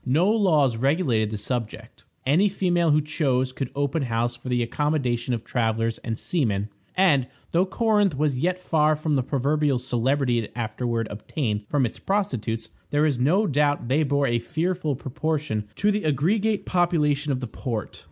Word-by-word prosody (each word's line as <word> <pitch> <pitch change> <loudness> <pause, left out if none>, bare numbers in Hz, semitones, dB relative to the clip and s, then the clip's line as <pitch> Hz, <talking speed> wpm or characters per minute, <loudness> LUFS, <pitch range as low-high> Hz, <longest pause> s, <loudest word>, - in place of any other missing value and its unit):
No 160 +10 +3
laws 155 - +3
regulated 130 - +1
the 110 - -4
subject. 115 +1 -5 0.2
Any 170 +10 +4
female 175 -3 +1
who 150 0 +4
chose 135 -4 0
could 130 -1 -4
open 145 +2 0
house 120 -1 -1
for 120 +2 -9
the 120 -1 +1
accommodation 125 -2 -1
of 115 -2 -2
travelers 115 -1 -1
and 115 -1 -4
seamen, 110 - -1 0.3
and, 150 -9 +3 0.2
though 180 +3 +2
Corinth 205 - +2
was 145 -2 +1
yet 180 +8 0
far 155 -4 +2
from 155 0 -2
the 135 - +3
proverbial 140 +2 +1
celebrity 125 +1 +1
it 110 - -5
afterward 115 0 -2
obtained 105 -1 -3
for 145 - 0
its 115 - -5
prostitutes, 115 - -2 0.2
there 145 +1 +2
is 140 -5 +1
no 175 +12 +3
doubt 145 - +1
they 140 +4 +3
bore 140 -1 +1
a 120 -2 +1
fearful 160 +4 -1
proportion 145 -4 -2
to 210 +1 +2
the 210 0 -1
aggregate 195 - +1
population 150 -5 +1
of 130 - -1
the 125 - -4
port. 115 -2 -5
140 Hz, 170 wpm, -24 LUFS, 120-160 Hz, 0.3 s, Any